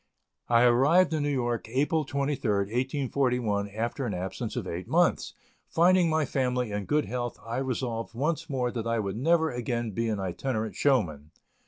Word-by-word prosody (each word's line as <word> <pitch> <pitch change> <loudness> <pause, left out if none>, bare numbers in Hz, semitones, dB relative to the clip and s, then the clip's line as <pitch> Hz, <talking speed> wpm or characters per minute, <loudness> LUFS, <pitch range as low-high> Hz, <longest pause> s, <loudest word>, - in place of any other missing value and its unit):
I 115 0 +5
arrived 140 +9 +4
in 155 - 0
New 145 - 0
York, 120 -5 -1
April 145 +4 +1
23rd, 120 -8 -1 0.4
1841, 120 -7 +1
after 115 +5 -3
an 105 - -2
absence 95 +6 -4
of 120 -6 -3
eight 90 0 -5
months; - - +1 0.3
finding 175 +1 +4
my 155 -1 +2
family 125 -3 -1
in 105 -1 -3
good 150 0 +1
health, 120 -1 -4
I 115 +1 -3
resolved 120 -3 -3
once 160 +5 -1
more 125 -3 -1
that 115 -2 -4
I 115 0 +1
would 100 -3 -2
never 160 +6 +2
again 120 -1 -2
be 115 +4 -1
an 105 -2 -1
itinerant 110 +4 -3
showman. 85 - +1
120 Hz, 170 wpm, -28 LUFS, 110-140 Hz, 0.4 s, I